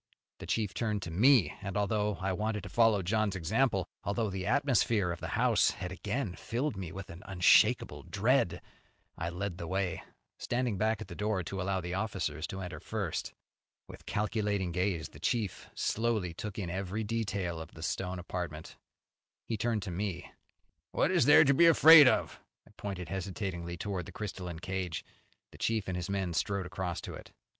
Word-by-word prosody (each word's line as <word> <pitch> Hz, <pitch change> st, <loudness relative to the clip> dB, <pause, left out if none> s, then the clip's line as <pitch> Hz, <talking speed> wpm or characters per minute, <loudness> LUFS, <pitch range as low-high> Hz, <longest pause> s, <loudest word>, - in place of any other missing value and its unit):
The -, -, -8 dB
chief 105 Hz, -4 st, 0 dB
turned 105 Hz, -4 st, -1 dB
to 85 Hz, -, -5 dB
me, 120 Hz, +5 st, +5 dB
and, 100 Hz, 0 st, -4 dB
although 105 Hz, 0 st, +1 dB
I 95 Hz, +1 st, -1 dB
wanted 105 Hz, +1 st, -2 dB
to -, -, -7 dB
follow 115 Hz, -4 st, +3 dB
John's 105 Hz, +1 st, +1 dB
example, 95 Hz, +3 st, +1 dB, 0.2 s
although 100 Hz, +2 st, -1 dB
the 95 Hz, 0 st, -4 dB
atmosphere 120 Hz, -7 st, +2 dB
of 85 Hz, -, -5 dB
the -, -, -5 dB
house -, -, +4 dB
had 90 Hz, -, -5 dB
again 105 Hz, +2 st, -3 dB
filled 125 Hz, +7 st, -2 dB
me 95 Hz, -4 st, -5 dB
with 95 Hz, 0 st, -8 dB
an 85 Hz, +1 st, -10 dB
unshakable 95 Hz, -2 st, +4 dB
dread, -, -, +1 dB, 0.5 s
I 85 Hz, -, -3 dB
led 90 Hz, +1 st, -4 dB
the 85 Hz, -, -5 dB
way, 95 Hz, -1 st, -1 dB, 0.4 s
standing 120 Hz, -5 st, -1 dB
back 110 Hz, 0 st, +1 dB
at -, -, -6 dB
the 90 Hz, -, -8 dB
door 105 Hz, 0 st, -1 dB
to 95 Hz, +2 st, -4 dB
allow 95 Hz, 0 st, -1 dB
the 90 Hz, 0 st, -5 dB
officers 95 Hz, -5 st, -2 dB
to 95 Hz, -, -6 dB
enter 90 Hz, -1 st, -6 dB
first. -, -, -4 dB, 0.5 s
With -, -, -13 dB
calculating 105 Hz, -3 st, -1 dB
gaze 90 Hz, -2 st, -1 dB
the -, -, -14 dB
chief 115 Hz, -7 st, -2 dB
slowly 110 Hz, -6 st, 0 dB
took 100 Hz, +3 st, -6 dB
in 90 Hz, -5 st, -3 dB
every 95 Hz, +4 st, -3 dB
detail 100 Hz, -6 st, -2 dB
of 80 Hz, -, -11 dB
the 80 Hz, -, -8 dB
stone 90 Hz, +2 st, -2 dB
apartment. 85 Hz, -3 st, -6 dB, 0.7 s
He 115 Hz, -, -2 dB
turned 110 Hz, -1 st, -1 dB
to 95 Hz, -, -5 dB
me. 90 Hz, -1 st, -4 dB, 0.6 s
"What -, -, +2 dB
is -, -, +4 dB
there 145 Hz, -, +8 dB
here -, -, +6 dB
to 140 Hz, -, +5 dB
be 170 Hz, +5 st, +6 dB
afraid 160 Hz, -2 st, +9 dB
of?" -, -, +1 dB, 0.3 s
I -, -, -19 dB
pointed 95 Hz, -4 st, -5 dB
hesitatingly 90 Hz, -2 st, -4 dB
towards 95 Hz, -2 st, -4 dB
the -, -, -8 dB
crystalline 90 Hz, -5 st, -5 dB
cage. 95 Hz, -3 st, -3 dB, 0.5 s
The -, -, -15 dB
chief 110 Hz, -3 st, 0 dB
and 95 Hz, -, -2 dB
his 90 Hz, 0 st, -4 dB
men 95 Hz, -3 st, -1 dB
strode 100 Hz, +2 st, -1 dB
across 90 Hz, -1 st, -4 dB
to -, -, -7 dB
it. -, -, -10 dB
95 Hz, 185 wpm, -31 LUFS, 90-110 Hz, 0.7 s, afraid